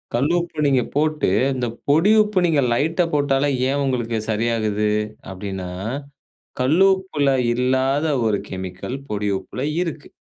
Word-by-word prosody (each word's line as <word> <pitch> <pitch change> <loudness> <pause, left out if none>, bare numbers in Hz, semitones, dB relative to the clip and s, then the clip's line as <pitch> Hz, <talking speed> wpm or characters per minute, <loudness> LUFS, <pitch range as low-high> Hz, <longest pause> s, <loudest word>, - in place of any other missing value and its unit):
கல் 140 +7 +1
உப்ப 170 -1 -6
நீங்க 130 -3 +3
போட்டு, 155 -3 +1 0.3
இந்த 125 -1 -1 0.2
பொடி 165 +9 +4
உப்ப 210 -3 0
நீங்க 155 -4 +2
லைட்டா 165 +7 +1
போட்டாலே, 145 -1 +2 0.2
ஏன் 140 +1 0
உங்களுக்கு 120 -4 -1
சரியாகுது. 110 -1 0 0.4
அப்படினா, 95 -1 -5 0.9
கல்லு 160 +10 +4
உப்புல 155 -7 -1 0.2
இல்லாத 130 +4 +1 0.2
ஒரு 105 -2 +1
கெமிக்கல், 95 +6 -5
பொடி 105 -1 -1
உப்புல 125 - -7 0.2
இருக்கு! 155 -4 -5
135 Hz, 130 wpm, -21 LUFS, 110-155 Hz, 0.9 s, பொடி